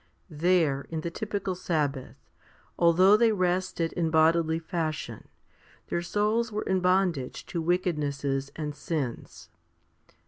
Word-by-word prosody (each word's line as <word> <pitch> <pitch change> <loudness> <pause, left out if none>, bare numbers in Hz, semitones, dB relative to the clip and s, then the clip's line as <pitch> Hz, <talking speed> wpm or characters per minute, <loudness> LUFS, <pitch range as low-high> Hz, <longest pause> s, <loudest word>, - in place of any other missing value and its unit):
There, 155 -3 +1
in 160 -1 -3
the 170 - -4
typical 205 -1 -3
sabbath, 150 -7 -2 0.6
although 180 +4 +5
they 230 +1 +4
rested 180 -3 0
in 165 -2 0
bodily 160 0 +3
fashion, 160 -2 -4 0.6
their 170 - -1
souls 215 +5 0
were 210 0 -2
in 190 -1 +1
bondage 180 -7 0
to 170 - -1
wickednesses 145 -6 -1
and 150 -2 -4
sins. 145 -6 -5
170 Hz, 115 wpm, -27 LUFS, 155-185 Hz, 0.6 s, although